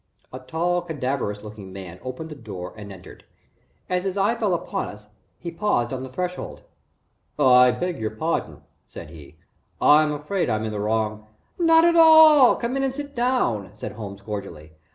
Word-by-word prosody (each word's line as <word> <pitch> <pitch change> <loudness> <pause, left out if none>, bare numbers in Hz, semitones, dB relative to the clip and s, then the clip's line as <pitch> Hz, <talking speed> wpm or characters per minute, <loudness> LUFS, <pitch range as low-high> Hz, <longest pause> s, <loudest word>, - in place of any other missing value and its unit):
A 130 - -6
tall 170 +7 -1
cadaverous 130 -10 -3
looking 105 -3 -10
man 90 -2 -9
opened 130 +6 -7
the - - -7
door 100 -9 -8
and 105 -2 -10
entered. 95 -2 -13 0.6
As 180 0 -1
his 195 0 -3
eye 200 +3 +2
fell 215 -6 0
upon - - -4
us, 105 0 -11 0.3
he 170 - -7
paused 165 -10 -1
on 130 - -4
the 130 - -7
threshold. 180 +6 -5 0.7
"I 125 -3 +6
beg 175 +7 -3
your 110 -1 -2
pardon," 155 +10 -3
he - - -21 0.3
said. 75 - -11
"I 80 0 -15 0.6
I'm 155 -1 0
afraid 150 +3 -2
I'm 110 -1 -1
in 110 - -3
the 105 - -4
wrong 110 0 -2 0.2
" - - -43
"Not 330 -1 +5
at 340 0 +3
all 315 -4 +7
come 240 +2 -3
in 270 - -1
and 265 -1 -1
sit 285 0 -7
down," 240 - 0
said - - -7
Holmes, 100 -2 -9
cordially. 100 -7 -7
130 Hz, 185 wpm, -23 LUFS, -, 0.7 s, all